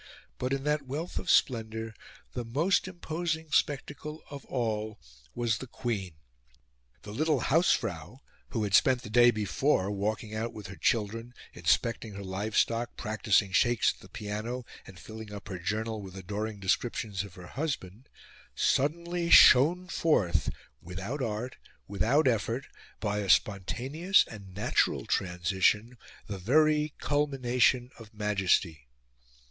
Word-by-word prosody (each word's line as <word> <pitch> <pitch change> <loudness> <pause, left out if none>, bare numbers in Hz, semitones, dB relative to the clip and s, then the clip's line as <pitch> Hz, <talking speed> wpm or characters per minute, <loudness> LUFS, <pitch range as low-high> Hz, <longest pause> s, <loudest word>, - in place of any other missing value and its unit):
But, 125 +1 -2
in 135 0 -1
that 150 -1 0
wealth 155 +7 -4
of - - -6
splendour, 110 -2 +1 0.4
the 120 - -3
most 150 +13 +1
imposing 165 -3 -4
spectacle 150 +1 -1
of 140 -1 -8
all 110 -3 -2 0.4
was 120 -3 0
the 130 - -7
Queen. 110 -9 -4 0.9
The 105 - -8
little 150 +1 +1
hausfrau, 125 - +1 0.3
who 110 - -2
had 100 -2 -3
spent 125 +4 +4
the 105 - -8
day 120 +1 +7
before 105 -1 +1
walking 105 +2 -2
out 110 +2 -3
with 105 -2 -9
her 95 - -8
children, 115 +3 -1 0.2
inspecting 90 +7 0
her 100 - -6
livestock, 110 +5 -1
practicing 105 -2 +1
shakes 120 +4 +3
at - - -22
the - - -15
piano, 110 +4 -5 0.2
and 95 - -12
filling 110 -1 -9
up 105 0 -9
her 90 -3 -5
journal 110 +4 -2
with 95 -2 -10
adoring 105 +3 -4
descriptions 100 0 -1
of 100 -3 -11
her 90 - -10
husband, 130 - -4 0.5
suddenly 170 +4 0
shone 170 +9 +7
forth, 150 - +1 0.3
without 95 - -5
art, 115 +1 -3 0.3
without 115 +10 +2
effort, 115 +2 0 0.3
by 105 -1 -1
a 100 -2 -3
spontaneous 130 - +2
and 100 -4 -11
natural 105 - +1
transition, 95 +6 +1 0.3
the 100 -2 -6
very 150 - +3
culmination 130 -4 +1
of 110 0 -14
Majesty. 95 - 0
115 Hz, 135 wpm, -29 LUFS, 100-135 Hz, 0.9 s, day